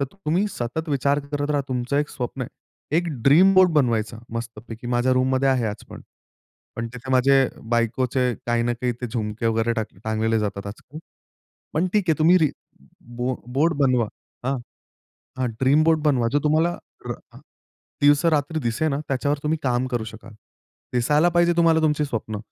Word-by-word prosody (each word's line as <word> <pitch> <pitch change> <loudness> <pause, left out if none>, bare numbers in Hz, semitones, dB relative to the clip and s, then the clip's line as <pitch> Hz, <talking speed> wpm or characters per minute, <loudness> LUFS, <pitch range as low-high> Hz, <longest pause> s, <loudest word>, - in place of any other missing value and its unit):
तर - - +2
तुम्ही 190 +1 0
सतत 140 +6 -4
विचार 140 0 +1
करत 145 0 -1
राहा 145 -1 +2
तुमचं 125 +1 -1
एक 150 +1 0
स्वप्न 125 +1 -5
आहे. 130 +4 -7
एक 175 +1 +1 0.2
ड्रीम 170 +9 +6
बोर्ड 185 -1 +6
बनवायचा 115 -6 +1 0.2
मस्तपैकी. 115 0 -7
माझ्या 120 +1 +1
रूममध्ये 130 +1 +2
आहे 130 -3 +2
आज 105 0 -5
पण. - - -10 0.8
पण 115 - -3
तिथे 130 +2 -7
माझे 135 0 +4 0.2
बायकोचे 125 +2 +1
काही 120 0 +1
ना 120 +1 0
काही 120 +1 -2
ते 125 - -2
झुमके 110 -1 -3
वगैरे 115 +1 +1
टा 110 - 0 0.2
टांगलेले 110 0 0
जातात 100 -1 -3
आजकाल. 120 +8 -9 0.7
पण 160 +4 +1
ठीक 210 -2 +2
आहे 160 - +2
तुम्ही 165 +3 +5
री 155 -4 +2 0.7
बो 125 +1 -1 0.2
बोर्ड 160 +4 +2
बनवा. 130 -5 +3 0.4
हां. 135 +1 +1 0.8
हां, 130 - 0
ड्रीम 140 +4 +4
बोर्ड 160 -1 +3
बनवा. 130 -6 +2
जो 145 - +3
तुम्हाला 160 +3 +2 0.3
रा - - -8 0.6
दिवस-रात्री 150 +1 +3
दिसेल 120 +5 0
ना 140 - -1
त्याच्यावर 140 +2 0
तुम्ही 155 +1 0
काम 125 -1 0
करू 120 -3 -2
शकाल. 110 0 -11 0.6
दिसायला 150 +7 +3
पाहिजे 175 0 +4
तुम्हाला 165 -1 +4
तुमची 150 -1 +2
स्वप्न. 110 -5 -4
130 Hz, 170 wpm, -23 LUFS, 120-150 Hz, 0.8 s, ड्रीम